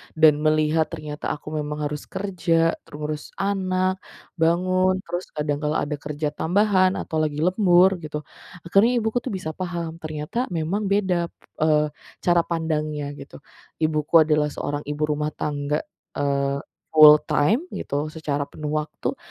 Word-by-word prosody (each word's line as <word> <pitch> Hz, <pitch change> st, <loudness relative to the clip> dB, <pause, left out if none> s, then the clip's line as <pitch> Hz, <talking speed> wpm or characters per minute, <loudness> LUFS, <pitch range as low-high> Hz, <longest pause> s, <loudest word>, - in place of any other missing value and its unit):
dan 155 Hz, -2 st, +5 dB
melihat 155 Hz, +1 st, +2 dB
ternyata 150 Hz, -2 st, -7 dB
aku 150 Hz, -, -18 dB
memang 150 Hz, 0 st, -3 dB
harus 150 Hz, 0 st, -4 dB
kerja, 170 Hz, -4 st, +1 dB, 0.2 s
ngurus 150 Hz, 0 st, -6 dB
anak, 185 Hz, -1 st, 0 dB, 0.4 s
bangun, 185 Hz, +3 st, +3 dB
terus 175 Hz, +2 st, -4 dB
kadang 150 Hz, -1 st, -1 dB
kala 150 Hz, 0 st, 0 dB
ada 150 Hz, 0 st, -2 dB
kerja 150 Hz, +1 st, -3 dB
tambahan 185 Hz, +2 st, +2 dB
atau 160 Hz, -, -3 dB
lagi 150 Hz, -1 st, -2 dB
lembur 185 Hz, 0 st, +5 dB
gitu, 150 Hz, -1 st, -6 dB, 0.4 s
akhirnya 195 Hz, +7 st, +4 dB
ibuku 220 Hz, +2 st, 0 dB
tuh 255 Hz, -, -5 dB
bisa 160 Hz, -4 st, -4 dB
paham 170 Hz, -1 st, -5 dB
ternyata 155 Hz, -, -3 dB
memang 195 Hz, +6 st, -1 dB
beda, 190 Hz, -4 st, +1 dB, 0.3 s
eee, 150 Hz, -1 st, +3 dB, 0.3 s
cara 175 Hz, -1 st, +4 dB
pandangnya 155 Hz, -3 st, -2 dB
gitu. 140 Hz, -, -11 dB, 0.5 s
Ibuku 155 Hz, +1 st, +4 dB
adalah 150 Hz, -1 st, +2 dB
seorang 145 Hz, 0 st, -3 dB
ibu 150 Hz, +1 st, -2 dB
rumah 150 Hz, 0 st, 0 dB
tangga, 145 Hz, 0 st, -2 dB, 0.3 s
eee, 140 Hz, 0 st, 0 dB, 0.3 s
full 150 Hz, -1 st, +10 dB
time 220 Hz, -, +2 dB
gitu 145 Hz, +2 st, -2 dB
secara 145 Hz, -3 st, -2 dB
penuh 150 Hz, 0 st, -6 dB
waktu, 150 Hz, 0 st, -3 dB
155 Hz, 140 wpm, -23 LUFS, 150-180 Hz, 0.5 s, full